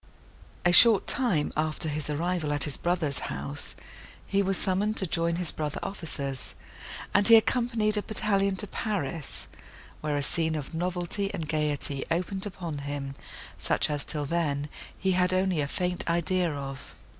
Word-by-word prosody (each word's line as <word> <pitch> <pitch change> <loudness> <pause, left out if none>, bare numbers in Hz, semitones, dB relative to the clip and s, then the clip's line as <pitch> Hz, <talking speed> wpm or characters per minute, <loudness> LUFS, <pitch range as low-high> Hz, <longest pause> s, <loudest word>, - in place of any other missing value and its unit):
A 175 - +5
short 220 0 +8
time 195 - +1
after 155 +1 -1
his 150 -1 -1
arrival 165 +1 -1
at 145 -1 +6
his 145 - 0
brother's 170 -5 -1
house, 70 +1 -5 0.5
he 200 0 +1
was 195 -1 0
summoned 205 +3 0
to 190 - +7
join 170 0 0
his 175 -2 +1
brother 150 -2 -4
officers, 140 -8 -5 0.6
and 200 - +5
he 230 - +9
accompanied 225 -2 +3
a - - +1
battalion 200 -2 0
to 200 - -1
Paris; 175 - -4 0.5
where 150 -1 -2
a 145 - 0
scene 160 +1 +3
of 150 +1 -5
novelty 180 +3 -1
and 160 - -5
gaiety 150 -3 0
opened 190 +4 -1
upon 170 -6 -6
him, 140 -1 -5 0.5
such - - +2
as, 145 -1 -1
till 150 -2 0
then, 145 -2 -1 0.3
he 190 - 0
had 180 0 +2
only 185 -4 +1
a 140 - -1
faint 180 +3 -2
idea 175 +1 +1
of. 135 -2 -7
170 Hz, 160 wpm, -27 LUFS, 150-190 Hz, 0.6 s, he